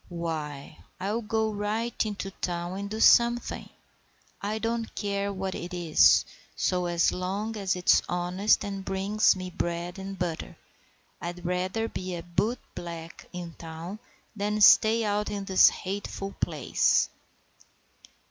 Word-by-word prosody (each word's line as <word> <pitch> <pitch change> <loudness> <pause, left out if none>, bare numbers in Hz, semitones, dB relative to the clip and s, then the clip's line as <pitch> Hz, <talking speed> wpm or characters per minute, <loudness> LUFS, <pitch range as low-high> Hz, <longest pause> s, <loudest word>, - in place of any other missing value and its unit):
"Why, 155 -4 -5 0.2
I'll 205 +5 -1
go 220 0 0
right 215 +3 -1
into 200 -2 -4
town 175 0 -3
and 200 0 -4
do 215 +1 -4
something. 235 +1 +4 0.7
I 210 +2 -2
don't 230 0 -2
care 200 -1 -1
what 190 -1 -3
it 180 +1 -6
is, 170 -3 +5 0.3
so 180 -1 0 0.2
long 200 +5 -3
as 195 -3 0
it's 180 0 +4
honest 180 +5 +2
and 200 -1 -4
it 190 - -9
brings 195 +3 +2
me 185 -1 -6
bread 175 +2 -3
and 195 0 -6
butter. 175 -3 -4 0.6
I'd 175 +1 -6
rather 185 +5 -1
be 185 -4 -5
a 170 - -6
bootblack 170 -4 -4
in 175 -2 -7
town 165 +5 -7 0.4
than 210 +1 -1
stay 220 +2 +7
out 210 0 0
in 200 -1 -4
this 190 -1 +7
hateful 195 0 -5
place." - - +1
195 Hz, 135 wpm, -28 LUFS, 175-210 Hz, 0.7 s, stay